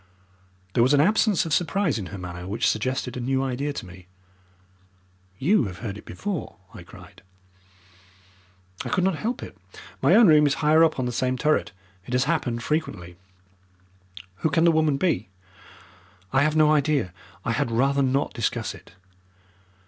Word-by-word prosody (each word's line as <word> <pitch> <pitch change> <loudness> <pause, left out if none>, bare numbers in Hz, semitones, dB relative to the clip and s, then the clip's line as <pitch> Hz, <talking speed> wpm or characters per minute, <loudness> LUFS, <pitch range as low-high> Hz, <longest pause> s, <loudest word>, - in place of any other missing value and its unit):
There - - +2
was 130 +5 +4
an - - +3
absence 210 +3 +3
of 160 - -2
surprise 175 - 0
in 95 - -6
her 100 - -8
manner 90 -1 -7
which 110 +5 0
suggested 125 +3 -1
a - - -4
new 130 +2 0
idea 135 +2 -2
to 140 - -6
me. 90 0 -14 1.3
"You 165 - +2
have 90 -2 -7
heard 100 -2 -5
it 105 - -12
before," 200 -6 -5 0.2
I - - -10
cried. - - -15 1.6
"I - - -5
could 185 - +1
not 190 0 +2
help 240 - -3
it. - - -10 0.5
My - - +5
own 230 - +7
room 150 -2 +6
is 140 - +1
higher 155 +1 +4
up 160 -1 +2
on 130 - -1
the 125 - -2
same 130 +2 -1
turret. 125 - +1 0.4
It 125 - -6
has 125 +1 +3
happened 135 -7 -1
frequently." 100 - -3 1.2
"Who 160 - 0
can 165 +3 +2
the 170 - +5
woman 155 -3 +2
be?" 140 - 0 1.0
"I 135 - +4
have 155 +1 +1
no 155 -1 +5
idea. 145 - +1 0.3
I - - 0
had 115 - 0
rather 135 +5 +1
not 135 +1 0
discuss - - -2
it." - - -16
140 Hz, 170 wpm, -24 LUFS, 115-155 Hz, 1.6 s, own